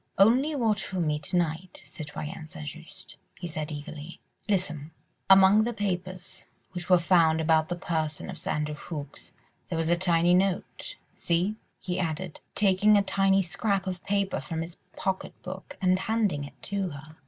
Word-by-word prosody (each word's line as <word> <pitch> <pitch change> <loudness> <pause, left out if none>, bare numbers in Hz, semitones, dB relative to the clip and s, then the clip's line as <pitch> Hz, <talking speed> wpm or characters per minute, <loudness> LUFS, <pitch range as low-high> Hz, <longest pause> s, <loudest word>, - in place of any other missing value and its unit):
"Only 255 +10 +5
watch 220 -7 +1
for 190 - -4
me 150 -3 +1
to 150 +4 -1
night, 170 +1 -2
Citoyenne 155 0 -7
St. 160 -3 -8
Just," 165 +5 -10 0.2
he 175 - -5
said 155 -2 -4
eagerly. 150 +2 -7 0.3
"Listen: 160 -7 0 0.4
among 195 +2 +8
the 240 0 -2
papers 185 -2 -4 0.2
which 175 0 -6
were 180 - +8
found 165 -2 +4
about 160 0 +3
the 175 - -1
person 160 -4 -2
of - - -7
Sir - - -5
Andrew 150 0 -1
Ffoulkes 150 -2 -7 0.4
there 165 - -2
was 165 0 0
a 175 - +5
tiny 175 -1 +3
note. 185 0 0 0.2
See!" 180 +5 0 0.2
he 185 0 -3
added, 165 0 -3 0.2
taking 205 +1 +5
a 200 - +4
tiny 195 0 +3
scrap 195 +2 0
of 185 -2 -4
paper 200 -1 0
from 160 +5 -4
his 165 +1 -9 0.2
pocket 190 -1 -3
book 185 +1 -8
and 185 -1 +3
handing 205 -8 0
it - - -13
to 200 -2 -1
her. 155 +1 -11
180 Hz, 170 wpm, -28 LUFS, 160-195 Hz, 0.4 s, among